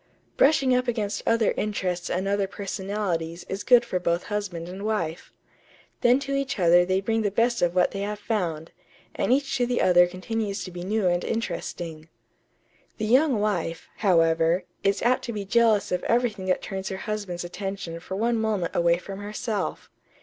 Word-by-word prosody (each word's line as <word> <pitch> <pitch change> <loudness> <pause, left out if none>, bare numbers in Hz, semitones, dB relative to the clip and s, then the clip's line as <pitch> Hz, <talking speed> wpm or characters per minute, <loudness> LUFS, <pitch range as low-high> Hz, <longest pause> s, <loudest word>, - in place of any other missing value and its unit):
Brushing 275 -3 +4
up 250 0 0
against 215 -4 -1
other 230 -1 +3
interests 185 -4 -2
and 190 +2 -1
other 200 0 +1
personalities 190 -4 -3
is 195 +1 -4
good 245 -1 +6
for 185 -6 -1
both 170 0 0
husband 195 -5 -4
and 190 +3 -7
wife. 180 -7 -2 0.7
Then 245 0 +5
to 275 0 -3
each 275 -1 -1
other 175 -1 +5
they 185 +1 +1
bring 225 +2 0
the 210 - +1
best 235 +4 +1
of 175 0 +1
what 180 - +3
they 195 - -5
have 205 +1 -3
found, 180 -7 -2 0.4
and - - 0
each 275 +2 +2
to 245 -1 +1
the 245 0 0
other 175 -1 +5
continues 200 +2 -3
to 185 - -7
be 175 0 -7
new 210 +2 0
and 175 0 +2
interesting.... 165 -8 -4 0.9
The 215 - -2
young 255 +1 +4
wife, 180 -6 -2
however, 165 -2 +3 0.2
is 200 0 +1
apt 250 +2 +2
to 235 - -4
be 205 -2 -4
jealous 225 0 +3
of 180 0 -1
everything 230 -5 +1
that 185 - +1
turns 190 -1 -4
her 190 - -4
husband's 200 -4 -4
attention 180 -1 -5
for 185 +2 -6
one 230 +3 +1
moment 210 -6 -1
away 170 0 +3
from 195 +2 -8
herself. 210 +1 -4
200 Hz, 180 wpm, -25 LUFS, 175-225 Hz, 0.9 s, good